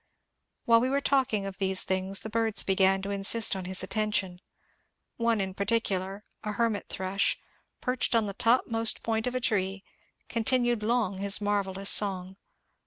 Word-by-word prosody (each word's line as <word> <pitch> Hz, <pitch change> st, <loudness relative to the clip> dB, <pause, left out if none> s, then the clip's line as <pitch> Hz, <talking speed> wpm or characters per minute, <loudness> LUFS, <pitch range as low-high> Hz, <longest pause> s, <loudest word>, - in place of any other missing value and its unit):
While 230 Hz, -1 st, +5 dB
we 255 Hz, -, 0 dB
were 275 Hz, +1 st, +1 dB
talking 265 Hz, -8 st, 0 dB
of 195 Hz, -1 st, -7 dB
these 190 Hz, -1 st, +1 dB
things 190 Hz, +1 st, -1 dB
the 220 Hz, -, -7 dB
birds 225 Hz, -1 st, +2 dB
began 190 Hz, 0 st, +2 dB
to 200 Hz, -, -4 dB
insist 200 Hz, +2 st, +5 dB
on 190 Hz, -1 st, -6 dB
his 185 Hz, +1 st, 0 dB
attention. 205 Hz, -4 st, -2 dB, 0.8 s
One 230 Hz, -2 st, +1 dB
in 190 Hz, -1 st, -3 dB
particular 200 Hz, -1 st, -2 dB
— -, -, -46 dB
a 210 Hz, -1 st, -4 dB
hermit 225 Hz, -1 st, -2 dB
thrush 190 Hz, +1 st, -1 dB, 0.2 s
— -, -, -49 dB
perched 250 Hz, -1 st, -1 dB
on 225 Hz, -2 st, +2 dB
the 200 Hz, -, -5 dB
topmost 230 Hz, 0 st, 0 dB
point 225 Hz, +1 st, -1 dB
of 250 Hz, -, -3 dB
a -, -, 0 dB
tree, 195 Hz, -4 st, -2 dB, 0.4 s
continued 240 Hz, 0 st, 0 dB
long 215 Hz, -4 st, -1 dB
his 200 Hz, 0 st, +3 dB
marvellous 200 Hz, -2 st, -1 dB
song. 190 Hz, -2 st, +2 dB
205 Hz, 170 wpm, -27 LUFS, 190-230 Hz, 0.8 s, While